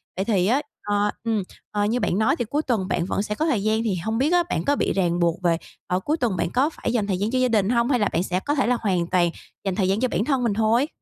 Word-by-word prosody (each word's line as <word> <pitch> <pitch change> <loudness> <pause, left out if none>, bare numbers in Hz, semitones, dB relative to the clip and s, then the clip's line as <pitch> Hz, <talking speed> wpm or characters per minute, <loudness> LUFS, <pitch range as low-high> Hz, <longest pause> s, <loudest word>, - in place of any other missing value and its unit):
Vậy 190 - -2
thì 195 -5 +2
á, 255 +7 +3 0.2
ờ, 205 0 +1
ừ, 225 -4 0 0.3
ờ, 205 0 0
như 230 +4 0
bạn 185 - 0
nói 260 +6 +3
thì 240 - -2
cuối 290 +8 -1
tuần 225 -10 -1
bạn 170 - 0
vẫn 195 - -1
sẽ 210 0 -3
có 310 - 0
thời 250 -11 +1
gian 220 +1 +1
thì 215 -5 0
hông 220 +6 -2
biết 285 +7 +2
á, 350 -1 +4
bạn 160 - -1
có 285 - +3
bị - - 0
ràng 175 -3 +1
buộc 170 +1 +1
về 170 -1 +3 0.3
ờ, 180 - 0
cuối 300 +11 -1
tuần 230 - 0
bạn - - 0
có 265 +5 +2
phải 310 - -4
dành 215 -4 0
thời 190 -3 0
gian 205 +5 -1
cho 255 - +1
gia 255 - +3
đình 215 -4 +2
hông 235 +1 +2
hay 250 -3 +2
là 205 - +2
bạn 170 - +1
sẽ 185 -1 -1
có 290 +9 -1
thể 270 - +1
là 250 0 +2
hoàn 180 -5 0
toàn 175 -1 +2 0.4
dành 195 -2 -1
thời 190 -2 +1
gian 195 +2 +1
cho 255 - +2
bản 225 - -1
thân 265 -3 +1
mình 230 - +1
thôi? 225 +6 +2
215 Hz, 315 wpm, -23 LUFS, 190-250 Hz, 0.4 s, á